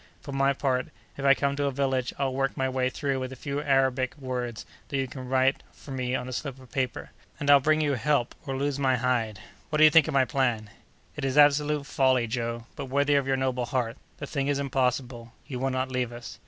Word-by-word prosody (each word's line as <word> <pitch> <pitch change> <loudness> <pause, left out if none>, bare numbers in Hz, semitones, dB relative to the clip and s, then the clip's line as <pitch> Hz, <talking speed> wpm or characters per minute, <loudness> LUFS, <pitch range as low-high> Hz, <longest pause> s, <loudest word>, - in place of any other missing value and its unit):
For 140 - -9
my 135 0 +2
part, 130 -1 0 0.3
if 140 - -7
I 135 0 +7
come 140 0 0
to 145 - 0
a 140 - +1
village, 130 -2 0
I'll 135 -2 0
work 135 0 -1
my 130 - +1
way 130 -1 0
through 135 0 -2
with 130 0 -4
a - - -7
few 140 +3 -4
Arabic 135 -2 +1
words 125 -4 -4 0.2
that 140 - -2
you 135 -1 0
can 130 0 -8
write 130 +1 +2
for 140 - -13
me 130 -1 -1
on 125 - -3
a 130 - -5
slip 135 0 -5
of 130 -1 -16
paper, 130 -3 -3 0.3
and 145 0 +3
I'll 140 - +8
bring 155 +3 +2
you 145 -2 +1
help 130 0 +1
or 135 -1 -2
lose 140 0 -1
my 130 -2 +3
hide. 120 -5 0 0.3
What 155 - 0
do 155 - +6
you 155 - +8
think 160 -2 +6
of - - -3
my 135 -1 +5
plan?" 120 -6 -1 0.4
"It 150 - -5
is 135 +1 -1
absolute 145 0 +4
folly, 130 -3 +2
Joe, 115 0 -3
but 140 - -5
worthy 140 +2 +1
of 140 -1 +2
your 135 0 +2
noble 130 -2 -1
heart. 125 -3 -1 0.2
The 140 - -5
thing 140 -1 -2
is 145 -1 +1
impossible. 125 -3 -1
You 125 -3 -5
will 135 +1 0
not 130 0 -2
leave 125 -2 -1
us." 120 0 -9
130 Hz, 240 wpm, -27 LUFS, 125-140 Hz, 0.4 s, I'll